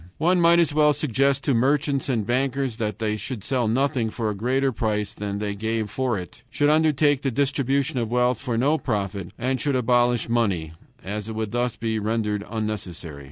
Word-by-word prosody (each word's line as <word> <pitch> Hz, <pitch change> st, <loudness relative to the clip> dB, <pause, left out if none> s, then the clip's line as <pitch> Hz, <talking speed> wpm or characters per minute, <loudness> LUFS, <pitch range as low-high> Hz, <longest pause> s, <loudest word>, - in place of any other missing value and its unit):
One 175 Hz, +3 st, +3 dB
might 170 Hz, 0 st, +6 dB
as 165 Hz, -3 st, +3 dB
well 150 Hz, 0 st, +4 dB
suggest 140 Hz, -1 st, +1 dB
to 140 Hz, -, +2 dB
merchants 140 Hz, +3 st, +1 dB
and 115 Hz, -5 st, 0 dB
bankers 130 Hz, 0 st, 0 dB
that 105 Hz, -4 st, -2 dB
they 110 Hz, -1 st, -1 dB
should 115 Hz, -2 st, -6 dB
sell 125 Hz, -2 st, 0 dB
nothing 130 Hz, 0 st, +1 dB
for 110 Hz, -1 st, -2 dB
a -, -, -5 dB
greater 130 Hz, +6 st, +1 dB
price 105 Hz, -3 st, -2 dB
than 100 Hz, -1 st, -4 dB
they 105 Hz, 0 st, -2 dB
gave 110 Hz, 0 st, -2 dB
for 125 Hz, 0 st, 0 dB
it, 90 Hz, -3 st, -9 dB
should 145 Hz, +1 st, +2 dB
undertake 150 Hz, -2 st, +3 dB
the 135 Hz, -, 0 dB
distribution 140 Hz, +1 st, 0 dB
of 115 Hz, -2 st, -2 dB
wealth 125 Hz, 0 st, +2 dB
for 125 Hz, -4 st, -2 dB
no 145 Hz, +6 st, +2 dB
profit, 100 Hz, -5 st, -2 dB
and 130 Hz, +1 st, -1 dB
should 140 Hz, 0 st, 0 dB
abolish 120 Hz, -1 st, +2 dB
money, 100 Hz, -9 st, 0 dB, 0.3 s
as 105 Hz, +2 st, -5 dB
it 110 Hz, -, -5 dB
would 110 Hz, -1 st, -3 dB
thus 120 Hz, 0 st, -1 dB
be 110 Hz, -1 st, -2 dB
rendered 105 Hz, -1 st, -1 dB
unnecessary. 100 Hz, -9 st, -5 dB
120 Hz, 195 wpm, -24 LUFS, 105-135 Hz, 0.3 s, might